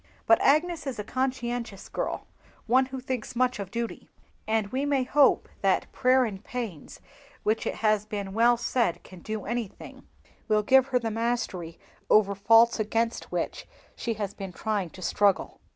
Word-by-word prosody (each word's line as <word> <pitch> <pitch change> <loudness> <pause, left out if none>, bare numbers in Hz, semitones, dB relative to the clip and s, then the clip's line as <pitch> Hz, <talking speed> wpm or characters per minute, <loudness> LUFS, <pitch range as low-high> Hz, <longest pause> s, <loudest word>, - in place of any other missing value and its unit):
But 225 - +5
Agnes 310 +1 +2
is 265 - -3
a 210 - -3
conscientious 245 -4 -3
girl, - - -3 0.4
one 255 +3 +3
who 265 0 -6
thinks 250 -2 -4
much 250 -1 +1
of 195 -2 -5
duty: 230 +3 -5 0.4
and 220 -1 +1
we 260 +5 -1
may 280 -2 +1
hope 280 +2 +4
that - - +1
"prayer 255 0 +3
and 200 -3 -6
pains," 225 -11 -6 0.4
which 215 +1 0
it - - -2
has 215 -1 +1
been 200 -2 -4
well 235 +2 +4
said 240 -5 0
can 185 - -13
do 215 +3 -5
anything, 235 -3 -6 0.4
will 215 -2 +2
give 265 +3 +5
her 260 -2 +2
the 230 -2 -2
mastery 225 -7 -2 0.3
over 205 -2 +5
faults 225 +4 +5
against 225 +2 -1
which - - -3 0.3
she 235 - -2
is 205 -2 -4 0.2
trying 210 -5 -2
to 185 +3 -11
struggle. 200 +1 +1
230 Hz, 165 wpm, -27 LUFS, 210-250 Hz, 0.4 s, But